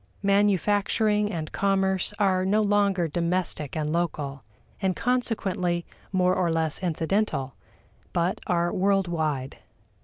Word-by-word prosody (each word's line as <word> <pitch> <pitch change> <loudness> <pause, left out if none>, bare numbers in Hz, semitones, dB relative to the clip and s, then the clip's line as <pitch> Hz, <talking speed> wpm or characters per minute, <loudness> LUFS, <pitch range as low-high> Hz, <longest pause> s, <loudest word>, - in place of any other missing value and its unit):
Manufacturing 205 +1 +2
and 160 -4 -4
commerce 190 -1 +1
are 190 -3 +2
no 210 +3 +2
longer 200 -4 +2
domestic 170 -3 -2
and 155 0 -1
local, 150 -5 -2 0.4
and 190 -2 +1
consequently 195 -8 -1 0.3
more 185 -1 +3
or 175 -2 +1
less 160 -2 0
incidental, 165 - -1 0.6
but 175 +1 0
are 175 -1 +1
world 195 0 +2
wide. 155 -6 -2
185 Hz, 115 wpm, -26 LUFS, 165-200 Hz, 0.6 s, more